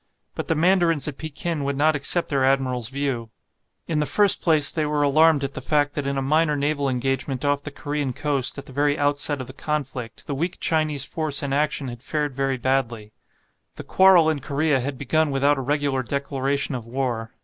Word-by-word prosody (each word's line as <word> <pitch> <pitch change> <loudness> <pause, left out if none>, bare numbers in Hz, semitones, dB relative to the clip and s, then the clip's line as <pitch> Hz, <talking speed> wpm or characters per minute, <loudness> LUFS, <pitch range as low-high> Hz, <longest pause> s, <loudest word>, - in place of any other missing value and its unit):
But - - -5
the 165 - +1
mandarins 170 -2 +2
at 145 - -6
Pekin 155 0 -4
would 140 0 -2
not 155 +2 +3
accept 155 +4 +1
their 140 -2 +1
admiral's 130 -3 0
view. 135 -4 -3 0.6
In 155 -2 -1
the 150 - 0
first 205 -2 +6
place 155 -4 +3
they 155 - -1
were 150 -1 0
alarmed 155 +1 +4
at 140 0 -3
the - - -6
fact 145 -1 +1
that 145 -2 -3
in 140 0 -2
a 135 - -1
minor 150 +2 +2
naval 145 -1 -1
engagement 135 +1 -2
off 145 0 +1
the 145 - -7
Korean 145 -1 -3
coast, 140 0 -1
at 140 - -8
the - - -12
very 145 +1 +1
outset 145 0 +1
of 130 - -5
the 130 - -11
conflict, 135 -6 -5
the 145 - -4
weak 170 +6 -3
Chinese 155 -4 +1
force 155 -3 -2
in 140 -1 -2
action 150 -1 0
had 120 -1 -8
fared 150 0 -2
very 135 0 -1
badly. 120 -4 -2 0.6
The - - -8
quarrel 190 -4 +5
in 155 -2 0
Korea 145 +1 0
had 135 +2 -4
begun 155 +4 0
without 140 +1 +1
a - - -2
regular 140 0 -1
declaration 140 +2 -2
of 120 -3 -6
war. 120 -3 -3
145 Hz, 205 wpm, -23 LUFS, 135-150 Hz, 0.6 s, first